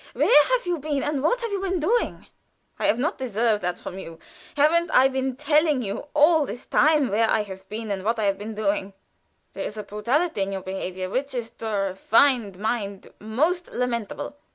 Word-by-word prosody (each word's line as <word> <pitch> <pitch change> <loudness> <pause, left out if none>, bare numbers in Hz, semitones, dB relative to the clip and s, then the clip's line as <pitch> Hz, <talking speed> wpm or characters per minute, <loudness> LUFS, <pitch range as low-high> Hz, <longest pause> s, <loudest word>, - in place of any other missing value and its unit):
Where 295 - +6
have - - +1
you 350 -2 -1
been, 290 -1 -2
and 295 -2 -1
what 485 - +1
have 465 -2 -3
you 395 -1 -2
been 375 -2 -1
doing?" 455 +10 0 0.5
"I - - +1
have - - +3
not 305 +8 -1
deserved 225 -3 0
that 180 0 -2
from 190 - -8
you. 165 -3 -9 0.4
Haven't 335 +4 +4
I 260 - +5
been 265 -1 -2
telling 300 -1 +2
you 200 +7 -5
all 300 0 +5
this 245 - -7
time 300 -3 +3
where 220 +3 +2
I 215 - +2
have 190 -1 -11
been 215 0 -5
and 190 -1 -3
what 230 +3 0
I 220 - -1
have 200 -1 +1
been 215 +1 -6
doing? 200 -2 -1 0.6
There - - -5
is 210 - -6
a 210 - -4
brutality 235 - -1
in 195 0 -1
your 190 - -3
behavior 185 -1 -4
which 270 +3 -2
is 235 -2 -4
to 225 - -7
a 200 -2 0
refined 220 +1 +2
mind 205 -2 -3
most 310 - -1
lamentable." 240 +2 -3
240 Hz, 205 wpm, -24 LUFS, 205-300 Hz, 0.6 s, Where